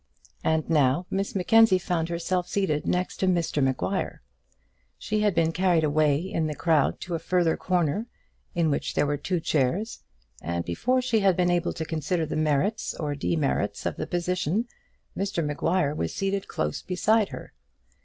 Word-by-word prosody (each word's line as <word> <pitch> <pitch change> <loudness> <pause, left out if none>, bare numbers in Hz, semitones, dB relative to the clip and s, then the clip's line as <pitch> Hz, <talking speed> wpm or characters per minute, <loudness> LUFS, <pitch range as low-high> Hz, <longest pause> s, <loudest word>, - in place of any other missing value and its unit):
And 160 -1 +1
now 150 +1 +2
Miss 195 +1 -2
Mackenzie 215 +1 +5
found 175 -2 -2
herself 175 +1 -1
seated 185 -7 -1
next 180 +1 -1
to 190 - 0
Mr 170 -5 +1
Maguire. 135 +9 -1 0.7
She 215 0 -2
had 210 -3 +2
been 165 -1 +2
carried 175 -2 +2
away 150 -1 +3
in 175 -4 -2
the 150 - -4
crowd 160 -4 +2
to 175 - -5
a 165 - -1
further 175 -2 +1
corner, 180 +4 0 0.5
in 165 -3 +2
which 140 - -2
there - - +3
were 145 0 0
two 175 +4 -1
chairs, 165 - 0 0.4
and 85 +1 -3
before 250 - 0
she 235 -3 +2
had 195 -3 +3
been 180 -1 +3
able 175 0 0
to 160 - -4
consider 160 +1 -1
the 155 - -4
merits 155 +6 0
or 150 -2 -3
demerits 145 0 -1
of - - -2
the - - -3
position, 180 +4 -1 0.5
Mr 195 -4 -1
Maguire 150 +1 0
was 85 - -2
seated 195 0 -1
close 75 0 -2
beside 210 +3 +2
her. - - -9
170 Hz, 170 wpm, -26 LUFS, 150-190 Hz, 0.7 s, Mackenzie